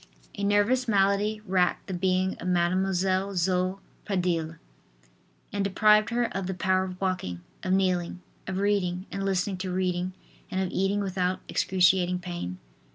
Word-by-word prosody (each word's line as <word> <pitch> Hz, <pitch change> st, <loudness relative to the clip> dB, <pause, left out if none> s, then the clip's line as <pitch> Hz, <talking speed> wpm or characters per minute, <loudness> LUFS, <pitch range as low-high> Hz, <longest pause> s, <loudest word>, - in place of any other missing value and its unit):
A 200 Hz, -, -5 dB
nervous 205 Hz, +5 st, +2 dB
malady 205 Hz, +1 st, +2 dB
racked 180 Hz, -1 st, +1 dB
the 190 Hz, -, -5 dB
being 185 Hz, +1 st, +1 dB
of -, -, -5 dB
Mademoiselle 185 Hz, +2 st, +1 dB
Zoe 185 Hz, +1 st, +1 dB, 0.3 s
Pradille 175 Hz, -5 st, -1 dB, 1.0 s
and 200 Hz, -, 0 dB
deprived 210 Hz, +2 st, +4 dB
her 240 Hz, +1 st, +1 dB
of 195 Hz, -2 st, -2 dB
the 190 Hz, -, -3 dB
power 185 Hz, +1 st, +1 dB
of 185 Hz, -1 st, -7 dB
walking, 180 Hz, -, -2 dB, 0.2 s
of 185 Hz, -, -2 dB
kneeling, 180 Hz, -2 st, +1 dB, 0.3 s
of 185 Hz, 0 st, -3 dB
reading 190 Hz, -2 st, 0 dB
and 195 Hz, -, -3 dB
listening 195 Hz, 0 st, 0 dB
to 185 Hz, 0 st, -4 dB
reading 180 Hz, 0 st, -1 dB, 0.4 s
and 190 Hz, -2 st, -2 dB
of 190 Hz, -2 st, -1 dB
eating 195 Hz, +2 st, +1 dB
without 185 Hz, -1 st, -1 dB
excruciating 180 Hz, -1 st, +2 dB
pain. 175 Hz, -, -5 dB
185 Hz, 150 wpm, -27 LUFS, 180-195 Hz, 1.0 s, deprived